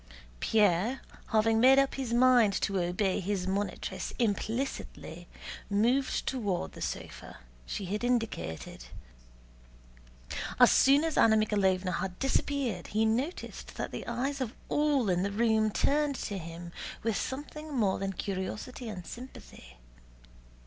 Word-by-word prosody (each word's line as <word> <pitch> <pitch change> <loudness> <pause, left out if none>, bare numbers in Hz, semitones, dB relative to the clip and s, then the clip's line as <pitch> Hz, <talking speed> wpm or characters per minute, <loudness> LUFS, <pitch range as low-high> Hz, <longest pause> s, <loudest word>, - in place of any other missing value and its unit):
Pierre, 210 +3 +2 0.3
having 220 0 +3
made 260 +3 +7
up 275 0 +3
his 265 -3 -4
mind 240 -3 +5
to 195 -1 0
obey 180 +2 0
his 190 -1 -2
monitress 200 +2 -3
implicitly, 220 - -3 0.4
moved 240 +7 +1
toward 205 -9 -2
the - - -11
sofa - - -6 0.3
she 200 - -4
had 210 +5 -3
indicated. 215 - -2 1.7
As - - +8
soon 280 +3 +5
as 325 -2 0
Anna 220 -1 +6
Mikháylovna 190 -4 +1
had 185 -1 -4
disappeared 270 -7 -1
he 220 +1 +1
noticed 255 +10 -2
that - - -4
the - - -6
eyes 265 +4 -2
of 240 -2 -3
all 290 -5 +2
in 180 -1 +2
the 200 - 0
room 220 0 +2
turned 290 +6 +1
to 205 -5 -4
him 170 +1 -8 0.3
with 225 -1 0
something 300 +5 -5
more 215 -8 +1
than 195 0 -2
curiosity 205 +6 -4
and 180 -5 -7
sympathy. 235 - -11
220 Hz, 130 wpm, -30 LUFS, 190-255 Hz, 1.7 s, As